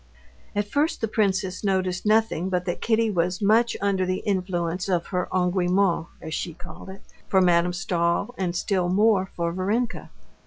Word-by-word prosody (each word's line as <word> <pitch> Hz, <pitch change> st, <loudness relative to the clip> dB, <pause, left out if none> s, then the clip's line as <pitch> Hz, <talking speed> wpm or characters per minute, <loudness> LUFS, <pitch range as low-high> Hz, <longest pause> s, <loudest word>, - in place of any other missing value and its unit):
At 205 Hz, 0 st, 0 dB
first 290 Hz, +8 st, 0 dB
the 225 Hz, -, -1 dB
princess 190 Hz, -3 st, 0 dB
noticed 190 Hz, -1 st, 0 dB
nothing 215 Hz, -5 st, +2 dB
but 180 Hz, -1 st, -1 dB
that 175 Hz, -, -3 dB
Kitty 225 Hz, -1 st, +2 dB
was 180 Hz, -1 st, 0 dB
much 225 Hz, +3 st, +3 dB
under 200 Hz, -2 st, +1 dB
the 185 Hz, 0 st, -2 dB
influence 180 Hz, -2 st, -1 dB
of 175 Hz, -2 st, +1 dB
her 180 Hz, 0 st, -1 dB
engouement, 180 Hz, -1 st, +1 dB, 0.2 s
as 160 Hz, -1 st, -6 dB
she 170 Hz, -1 st, -3 dB
called 175 Hz, +2 st, -11 dB
it, 190 Hz, +1 st, -11 dB, 0.2 s
for 190 Hz, -, +3 dB
Madame 175 Hz, -1 st, +3 dB
Stahl, 175 Hz, +5 st, -1 dB
and 180 Hz, -2 st, -2 dB
still 180 Hz, -1 st, 0 dB
more 195 Hz, 0 st, +3 dB
for 170 Hz, -1 st, -1 dB
Varenka. 210 Hz, +7 st, -2 dB
185 Hz, 165 wpm, -24 LUFS, 175-205 Hz, 0.2 s, much